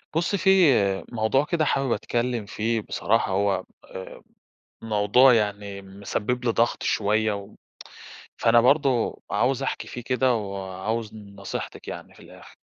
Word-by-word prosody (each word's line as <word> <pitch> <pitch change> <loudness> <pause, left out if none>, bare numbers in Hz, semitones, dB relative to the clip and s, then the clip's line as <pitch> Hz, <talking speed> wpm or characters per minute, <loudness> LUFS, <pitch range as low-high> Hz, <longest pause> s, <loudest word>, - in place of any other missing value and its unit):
بُصي 175 +4 +1
في 190 - +2 0.6
موضوع 120 +5 +1
كده 160 -2 0
حابب 135 -3 0
أتكلّم 120 -2 -1
فيه 110 +2 -1
بصراحة 105 0 0
هو 100 0 +1 0.2
آآ 95 - -10 0.6
موضوع 115 +4 +4
يعني 100 -2 -2
مسبّب 100 +5 -4
لي 120 - +2
ضغط 115 +1 +1
شوية 110 +1 +1
و 100 0 -7 0.8
فأنا 115 0 +5
برضه 130 -1 +2
عاوز 125 +6 +1
أحكي - - -3
فيه 120 - -7
كده 125 +1 +1
وعاوز 100 +2 -4
نصيحتِك 100 -2 -8
يعني - - -8
في - - -18
الآخر. - - -15
110 Hz, 130 wpm, -25 LUFS, 100-125 Hz, 0.8 s, فأنا